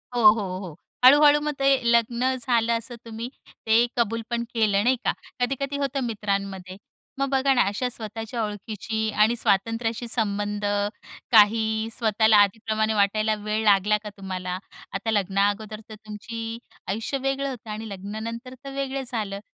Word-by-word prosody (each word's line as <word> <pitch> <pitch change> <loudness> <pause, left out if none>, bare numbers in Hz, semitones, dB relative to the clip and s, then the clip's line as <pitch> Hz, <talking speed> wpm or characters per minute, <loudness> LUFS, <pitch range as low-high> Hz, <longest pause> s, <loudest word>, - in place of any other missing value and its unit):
हो, 240 - +1
हो, 195 -5 -3
हो. 180 -6 -8 0.3
हळू-हळू 290 +3 +8
मग 300 0 -1
ते 275 - +2 0.2
लग्न 235 +2 +2
झालं 235 -2 +1
असं 235 +1 -6
तुम्ही 230 +1 -6 0.4
ते 225 +2 +5
कबूल 230 -1 +1
पण 235 -1 -1
केलं, 210 -3 +2
नाही 255 +2 +3
का, - - +4 0.3
कधी-कधी 275 +3 -1
होतं 275 -1 -1
मित्रांमध्ये. 200 -4 -3 0.4
मग 275 0 0
बघा 270 0 +3
ना, 245 - +4
अशा 245 +5 -1
स्वतःच्या 225 0 -5
ओळखीची 215 +1 -3
आणि 220 +3 +5
स्वातंत्र्याशी 225 +2 0
संबंध, 205 -2 -1 0.7
काही 220 0 +4
स्वतःला 220 -1 +4
आधीप्रमाणे 220 +2 +2
वाटायला 215 +1 +2
वेळ 215 +1 0
लागला 205 +1 +4
का 210 - -5
तुम्हाला? 185 -2 -4 0.4
आता 215 +3 -2
लग्ना 195 -1 +2
अगोदर 215 +1 -5
तर 215 - -8
तुमची 225 +2 -7 0.3
आयुष्य 225 +7 -2
वेगळं 270 +1 -1
होतं 235 -4 -8
आणि 215 +1 -6
लग्नानंतर 220 +6 -6
तर 275 0 -7
वेगळं 275 0 -2
झालं. 210 -5 -3
220 Hz, 150 wpm, -25 LUFS, 205-240 Hz, 0.7 s, हळू-हळू